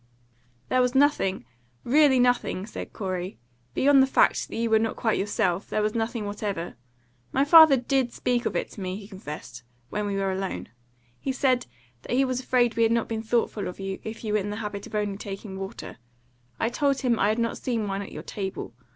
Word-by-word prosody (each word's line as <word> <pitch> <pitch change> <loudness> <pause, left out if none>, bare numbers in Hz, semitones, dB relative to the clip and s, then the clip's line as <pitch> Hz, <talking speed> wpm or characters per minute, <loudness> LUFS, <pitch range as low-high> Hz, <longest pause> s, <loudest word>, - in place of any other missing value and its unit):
"There 255 - +3
was 250 +1 +1
nothing 265 - +2 0.4
really 285 +1 +5
nothing," 245 -6 +1
said 215 - -7
Corey. 185 -1 -4 0.4
"Beyond 275 0 +5
the 265 - +4
fact - - +3
that - - -8
you 230 +1 0
were 220 - +6
not 225 0 -1
quite 220 -3 0
yourself, 190 -2 0
there 215 - 0
was 215 0 0
nothing 225 -1 -2
whatever. 205 -4 -4 0.6
My 275 - +2
father 315 -2 +9
DID 255 0 0
speak 245 0 0
of - - -4
it - - -2
to 205 - -9
me," 185 0 -3
he 200 0 -9
confessed, 150 - -8 0.3
"when 210 0 -2
we 200 - -2
were 195 -1 0
alone. 190 - -4 0.5
He 270 - -2
said 255 -2 +1 0.3
that 240 - -3
he 270 +1 +4
was 255 -1 -1
afraid 245 -2 +2
we 230 - 0
had 225 0 +4
not 230 -1 +1
been 225 -1 -2
thoughtful 225 -2 0
of 180 - -7
you, 195 0 -4
if 220 +1 -7
you 215 -1 -2
were 215 - +3
in 205 +1 -3
the 205 - -3
habit 210 -2 -5
of 205 -2 -2
taking 195 0 -7
only 190 0 -6
water; 195 +4 -7 0.6
I 225 - +1
told 275 +1 +1
him 245 -4 +1
I 205 - +3
had 215 - +1
not 230 -1 -1
seen 230 -4 -1
wine 195 0 -2
at 200 - -8
your - - -7
table. 190 - -5
220 Hz, 215 wpm, -26 LUFS, 195-250 Hz, 0.6 s, father